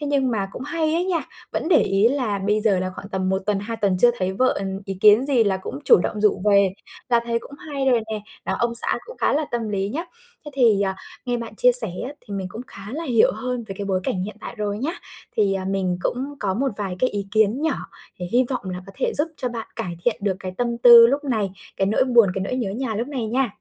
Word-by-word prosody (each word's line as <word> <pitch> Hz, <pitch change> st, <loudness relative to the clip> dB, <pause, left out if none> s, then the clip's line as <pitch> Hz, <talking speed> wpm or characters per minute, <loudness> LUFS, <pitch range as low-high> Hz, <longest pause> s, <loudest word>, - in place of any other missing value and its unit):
thế 295 Hz, -, -3 dB
nhưng 275 Hz, -3 st, +1 dB
mà 200 Hz, -4 st, -1 dB
cũng -, -, -7 dB
hay 315 Hz, +2 st, -1 dB
ấy 345 Hz, +2 st, +1 dB
nha, 360 Hz, -3 st, 0 dB, 0.3 s
vẫn -, -, -2 dB
để 335 Hz, -5 st, +5 dB
ý 195 Hz, +3 st, +3 dB
là 245 Hz, -7 st, -1 dB
bây 210 Hz, +2 st, 0 dB
giờ 205 Hz, -4 st, +2 dB
là 185 Hz, 0 st, -2 dB
khoảng 195 Hz, -, -9 dB
tầm 190 Hz, -2 st, -2 dB
1 190 Hz, 0 st, 0 dB
tuần, 210 Hz, -2 st, +1 dB
2 225 Hz, +2 st, -5 dB
tuần 200 Hz, -4 st, +1 dB
chưa 245 Hz, -, +7 dB
thấy 185 Hz, 0 st, -1 dB
vợ, 255 Hz, +7 st, +2 dB
ừm, 195 Hz, 0 st, -4 dB
ý 195 Hz, -, -4 dB
kiến 215 Hz, +5 st, +6 dB
gì 255 Hz, -5 st, +3 dB
là 195 Hz, -2 st, +1 dB
cũng 185 Hz, -7 st, -7 dB
chủ -, -, +7 dB
động 210 Hz, -, -3 dB
rủ 205 Hz, -3 st, +2 dB
về, 200 Hz, -1 st, +5 dB, 0.4 s
là 235 Hz, -1 st, +3 dB
thấy 230 Hz, 0 st, 0 dB
cũng 280 Hz, -, -12 dB
hay 280 Hz, -3 st, -4 dB
rồi 245 Hz, -3 st, +4 dB
nè, 215 Hz, -, -3 dB, 0.2 s
đó, -, -, -1 dB
ông 235 Hz, 0 st, 0 dB
xã 235 Hz, -, -2 dB
cũng -, -, -10 dB
khá -, -, +2 dB
là 305 Hz, +2 st, +1 dB
tâm 235 Hz, -2 st, -2 dB
lý 200 Hz, -1 st, -1 dB
nhá. 315 Hz, +10 st, -3 dB, 0.4 s
Thế 295 Hz, -, -7 dB
thì, 230 Hz, -7 st, +4 dB
à, 190 Hz, -1 st, -1 dB, 0.3 s
nghe 245 Hz, -1 st, -1 dB
bạn 230 Hz, -2 st, -7 dB
chia 250 Hz, +3 st, +4 dB
sẻ 235 Hz, -4 st, +7 dB, 0.2 s
á 270 Hz, -, -5 dB
thì 205 Hz, -, -8 dB
mình 195 Hz, -1 st, -3 dB
cũng 225 Hz, -, -7 dB
khá 195 Hz, -, -12 dB
là 320 Hz, +4 st, -4 dB
hiểu 240 Hz, -7 st, +3 dB
hơn 245 Hz, +2 st, -4 dB
về 195 Hz, -, -5 dB
cái 200 Hz, -, -3 dB
bối 190 Hz, -2 st, 0 dB
cảnh 185 Hz, 0 st, -2 dB
hiện 215 Hz, -, -7 dB
tại -, -, -7 dB
rồi 205 Hz, -1 st, -2 dB
nhá. 285 Hz, +8 st, -2 dB, 0.4 s
Thì, 200 Hz, -3 st, +2 dB
à, 190 Hz, -1 st, -3 dB
mình 185 Hz, -2 st, -1 dB
cũng 270 Hz, +4 st, -2 dB
có 195 Hz, -2 st, -1 dB
một 270 Hz, +6 st, 0 dB
vài 195 Hz, -3 st, -4 dB
cái 255 Hz, -, +2 dB
ý 200 Hz, -1 st, -4 dB
kiến 220 Hz, +5 st, +2 dB
nhỏ 320 Hz, -, +1 dB, 0.4 s
thì 180 Hz, -, -4 dB
hy 250 Hz, +2 st, +4 dB
vọng 245 Hz, -8 st, -3 dB
là 180 Hz, 0 st, -6 dB
có 195 Hz, -, -11 dB
thể -, -, 0 dB
giúp 295 Hz, -, +3 dB
cho 255 Hz, -, -2 dB
bạn 230 Hz, -2 st, -6 dB
cải 175 Hz, -2 st, -4 dB
thiện 240 Hz, -, +2 dB
được 200 Hz, -2 st, -1 dB
cái 185 Hz, -1 st, -5 dB
tâm 235 Hz, -1 st, -1 dB
tư 235 Hz, -1 st, +9 dB
lúc 280 Hz, +4 st, -1 dB
này, 220 Hz, -8 st, -1 dB, 0.3 s
cái 195 Hz, -, +1 dB
nỗi 215 Hz, +6 st, +2 dB
buồn, 240 Hz, -5 st, +5 dB
cái 190 Hz, -, -2 dB
nỗi 225 Hz, -, -3 dB
nhớ 240 Hz, -6 st, -2 dB
nhà 230 Hz, +2 st, -3 dB
lúc 230 Hz, +5 st, -3 dB
này 260 Hz, -6 st, -3 dB
nha. 250 Hz, +2 st, 0 dB
225 Hz, 275 wpm, -22 LUFS, 195-255 Hz, 0.4 s, tư